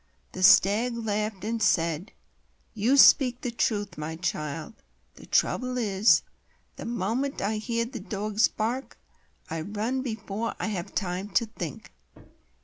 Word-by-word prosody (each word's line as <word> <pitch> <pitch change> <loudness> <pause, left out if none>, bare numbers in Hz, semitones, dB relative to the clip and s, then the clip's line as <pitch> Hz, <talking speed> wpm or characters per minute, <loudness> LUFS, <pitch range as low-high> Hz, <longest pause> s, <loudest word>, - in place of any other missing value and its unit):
The 185 - -7
Stag 210 +5 +5
laughed, 210 -3 -2
and 225 +1 -2
said: 165 +2 +1 0.6
"You 230 +6 +2
speak 255 -3 +6
the 245 - -3
truth, 205 -6 -1
my 155 +1 -4
child. 155 -2 -4 0.4
The - - -15
trouble 255 0 +1
is,—the 210 -2 0
moment 235 +5 -2
I 215 +2 -1
hear 230 +1 -1
the 240 0 -7
dogs 210 +2 0
bark, 240 +5 -3 0.5
I 165 0 -2
run 215 +8 -2
before 220 -2 -4
I - - -2
have 195 -1 -5
time 185 +1 -2
to 230 - +4
think." 175 - -7
215 Hz, 135 wpm, -27 LUFS, 190-235 Hz, 0.6 s, speak